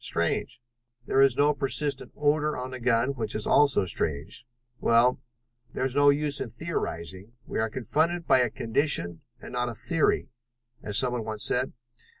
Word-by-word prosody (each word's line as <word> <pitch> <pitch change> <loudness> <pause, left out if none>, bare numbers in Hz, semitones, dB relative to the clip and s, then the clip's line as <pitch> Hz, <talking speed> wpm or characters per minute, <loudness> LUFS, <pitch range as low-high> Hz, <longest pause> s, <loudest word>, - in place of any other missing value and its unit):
Strange. 120 - -2 0.5
There 135 - +2
is 135 -2 +4
no 145 +1 +4
persistent 140 0 -1
odor 150 +1 +1
on 125 0 -5
the 130 - -7
gun, 120 +1 +1
which 115 -5 -3
is 110 - -2
also 140 -8 +3
strange. 80 - -1 0.3
Well, 120 +2 +3 0.5
there's 130 -1 -1
no 145 0 +5
use 145 0 +2
in 125 - -4
theorizing: 105 - -5
we - - -4
are 110 0 0
confronted 160 +9 -1
by 130 - +4
a 125 -1 +2
condition 115 - 0 0.2
and - - -11
not 125 0 -1
a 115 - -7
theory, 155 +7 0 0.5
as 105 -1 -2
someone 125 -3 +1
once 110 0 -3
said. 130 +1 0
125 Hz, 160 wpm, -26 LUFS, 115-145 Hz, 0.5 s, no